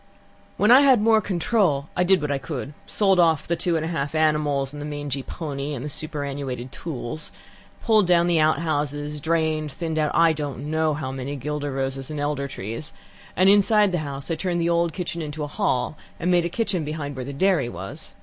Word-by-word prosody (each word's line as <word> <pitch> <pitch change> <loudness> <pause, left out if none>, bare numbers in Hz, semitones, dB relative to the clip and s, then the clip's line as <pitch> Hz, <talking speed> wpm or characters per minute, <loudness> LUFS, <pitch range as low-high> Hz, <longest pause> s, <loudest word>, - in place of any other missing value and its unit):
"When 210 +3 +4
I 260 +3 +9
had 265 -4 +6
more 220 0 +4
control 175 -6 +1
I 180 - +2
did 185 -1 +4
what 150 - -1
I 140 - 0
could: 140 0 -5
sold 195 -3 +2
off 160 -3 +3
the 170 - +1
two 170 0 0
and 160 0 0
a - - -3
half 145 -2 -2
animals, 150 -3 +1
and 145 - -7
the - - -4
mangy 145 -2 -4
pony, 145 0 -5
and 125 - -5
the - - -3
superannuated 140 -4 -4
tools; 150 -2 -6 0.5
pulled 215 -5 +4
down 175 -1 +4
the 175 -2 +2
outhouses; 150 -2 0
drained; 160 -1 0
thinned 160 +2 -3
out 150 -1 +2
I 165 -1 +5
don't 145 -1 -5
know 160 -1 +1
how 135 -3 -4
many 135 +2 -4
guelder 145 +1 -3
roses 135 0 -3
and 150 -1 -4
elder 145 -1 -1
trees; 115 +3 -6 0.4
and 185 +2 +4
inside 205 0 +5
the 175 - 0
house 140 0 -5
I - - +1
turned 175 0 -1
the 170 0 +1
old 170 0 +2
kitchen 170 0 -4
into 150 0 -5
a - - -1
hall, 130 -1 -1 0.2
and 180 - +1
made 175 -1 +3
a - - -1
kitchen 185 -3 -1
behind 150 -2 -4
where 130 - -4
the 140 - -6
dairy 145 -3 +2
was. 95 0 -8
155 Hz, 210 wpm, -24 LUFS, 140-170 Hz, 0.5 s, I